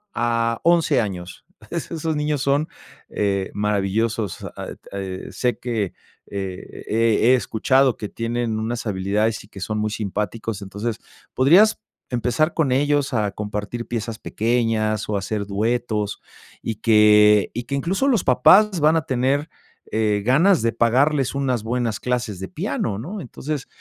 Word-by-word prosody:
a 115 -1 0
11 170 -5 +3
años, 90 -4 -6 0.3
es 170 -1 -4
esos 160 -1 -2
niños 150 -1 -1
son, 140 +3 +1 0.4
eh, 100 -2 -1
maravillosos, 105 0 -1
ah, - - -5
et - - -10
eh, 95 -1 -5
sé 125 -1 -1
que, 115 -6 -2 0.3
e 95 -2 -6
e 115 +2 +3
he, - - +7
escuchado 130 +2 +2
que 105 - -5
tienen 115 -1 -2
unas 115 +2 -3
habilidades 105 +3 0
y - - -17
que 100 - -11
son 105 +3 -2
muy 105 0 0
simpáticos, 105 +1 -3
entonces, 100 +4 -4 0.4
podrías 180 - +5 0.3
empezar 125 +6 +1
con 150 -6 +1
ellos 145 0 +1
a 105 -4 +1
compartir 105 +3 -5
piezas 115 -1 -4
pequeñas 110 -2 0
o 105 - 0
hacer 100 +1 -3
duetos, 105 0 -1 0.4
y 115 - -3
que 105 -1 +5
y 120 - -2
que - - -6
incluso, 185 - 0
los 235 -8 +2
papás 185 - +5
van 155 +2 +5
a 160 - -2
tener, 135 +3 0 0.4
eh, 105 -2 +1
ganas 165 - +4
de 115 0 +1
pagarles 135 +3 +2
unas 130 -5 0
buenas 115 -1 -1
clases 125 -6 -2
de 95 - -5
piano, 100 +2 -2
¿no?, 190 - -6
entonces, 145 +1 -5
115 Hz, 150 wpm, -22 LUFS, 105-135 Hz, 0.4 s, he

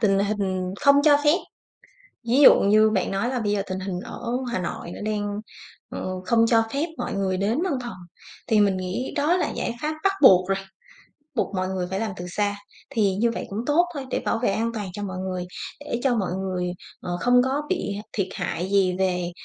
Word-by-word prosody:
tình 195 -3 +3
hình 195 -2 -1 0.2
không 280 0 +6
cho 290 -1 +7
phép, 295 +3 +5 0.9
ví 260 +5 +4
dụ - - +10
như 215 +2 +5
bạn 190 -4 0
nói 195 +5 0
là 250 -2 -1
bây 205 -2 0
giờ 200 -1 +1
tình 185 0 -4
hình 185 -2 -4
ở - - -8 0.3
Hà 235 - 0
Nội 170 -1 -5
nó - - -9
đang, 205 -1 -2 0.5
ừ, - - -4 0.2
không 230 -1 +4
cho 225 -1 +4
phép 290 +4 0
mọi - - -3
người 190 -1 0
đến 220 - 0
văn 370 - 0
phòng 240 - -6 0.5
thì 215 -1 +3
mình 200 -2 +3
nghĩ 185 +7 -3
đó 310 +5 +3
là - - 0
giải - - -3
pháp 310 +1 -1
bắt 390 - +4
buộc 185 -6 +7
rồi, 195 0 +1 0.8
buộc 195 - -1
mọi 185 0 0
người 185 -1 -2
phải 190 - -2
làm 220 -1 -2
từ 175 - -6
xa. 205 +3 -1 0.3
Thì 200 -4 +1
như 230 +3 +2
vậy - - -4
cũng 200 - -4
tốt 320 +4 +4
thôi 275 -3 -5
để - - 0
bảo - - +1
vệ - - +3
an 230 +3 0
toàn 205 -5 -4
cho 205 - -5
mọi 190 -2 -4
người, 185 -1 -3 0.3
để 290 -5 -4
cho 255 -3 +3
mọi 195 -5 -1
người, 185 -1 -2 0.3
ờ, 175 0 -3
không 245 0 +5
có 270 +3 0
bị 205 - -1 0.2
thiệt 195 -3 0
hại 180 +3 -3
gì 195 -2 +3
về, 180 -2 0
205 Hz, 220 wpm, -24 LUFS, 190-240 Hz, 0.9 s, dụ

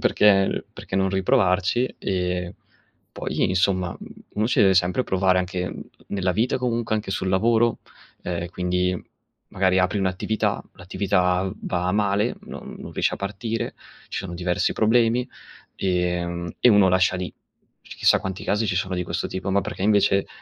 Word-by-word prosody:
perché 100 -2 +3
perché 95 - -6
non 95 0 +2
riprovarci? 95 +3 +2
E 90 -1 -2 0.6
poi, - - -1
insomma, 90 -1 +1 0.4
uno 105 +1 0
ci - - +1
deve 95 -1 +5
sempre 90 +7 +2
provare 95 -2 +2
anche 90 0 -3 0.4
nella 95 -2 0
vita, 115 +7 0
comunque 120 -3 -1
anche 105 -2 -2
sul 95 0 -1
lavoro, 115 +4 +2 0.4
ehm, 85 -1 -3
quindi 90 0 0 0.5
magari 95 0 +2
apri 90 +3 +1
un'attività, 95 +3 -1
l'attività 90 0 0
va 90 0 -1
male 105 +2 +1
non - - -9
non - - -9
riesce - - 0
a - - -10
partire, 105 +3 -3 0.3
c - - -15
sono 90 -2 -5
diversi 90 0 0
problemi, 115 +2 +2 0.5
ehm, 90 -2 -1
e 125 - +6
uno 100 -3 +6
lascia 95 0 +3
lì; 90 0 -4 0.5
chissà - - +2
quanti 95 0 -5
casi 105 +2 0
ci 90 - 0
sono 95 0 -1
di 90 - -1
questo 85 0 -3
tipo. 95 +1 -4
Ma 100 +1 +2
perché, 90 +1 -6
invece, 100 -1 +3
95 Hz, 155 wpm, -24 LUFS, 90-105 Hz, 0.6 s, e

